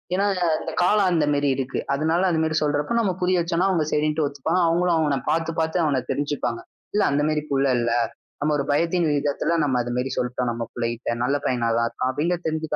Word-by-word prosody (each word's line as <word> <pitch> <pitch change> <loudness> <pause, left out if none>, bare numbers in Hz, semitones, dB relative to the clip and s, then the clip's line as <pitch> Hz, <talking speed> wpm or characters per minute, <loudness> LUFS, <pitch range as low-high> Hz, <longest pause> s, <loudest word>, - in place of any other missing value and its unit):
ஏன்னா 195 +2 +1 0.3
அந்தக் - - -5
காலம் 200 +1 +3
அந்த 160 -3 +2
மாதிரி 145 -1 +1
இருக்கு. 130 0 -3
அதனால 160 +5 +1
அந்த 160 -2 +1
மாதிரி 155 0 0
சொல்றப்போ, 145 +8 0
நம்ம 195 -5 0
புரிய 180 -1 +2
வச்சோம்னா 170 +3 +1
அவங்க 160 -5 +1
சரின்னு 150 +1 +1
ஒத்துப்பாங்க. 150 +6 -1
அவங்களும் 170 0 +2
அவன 145 -3 +1
பாத்து 165 0 0
பாத்து 160 +2 0
அவனத் 130 -4 -1
தெரிஞ்சுப்பாங்க. 140 -5 -2 0.3
இல்ல 210 - +3
அந்த 145 +1 +1
மாதிரி 150 -1 0
புள்ள 140 0 +2
இல்ல. 120 0 0 0.5
நம்ம 150 +1 +1
ஒரு 140 - -1
பயத்தின் 170 +2 +1
விதத்துல 145 +3 0
நம்ம 130 -3 +1
அதை 120 0 -4
மாதிரி 130 +1 -1
சொல்லிட்டோம், 125 0 -1
நம்ம 115 0 -4
புள்ளைட்ட. 120 0 -3
நல்ல 140 +3 +1
பையனா 120 -2 0
தான் 115 - +1
இருக்கான் 130 +2 -2
அப்படின்னு 170 +6 0
தெரிஞ்சுக்க 160 -1 -2
150 Hz, 200 wpm, -23 LUFS, 135-165 Hz, 0.5 s, காலம்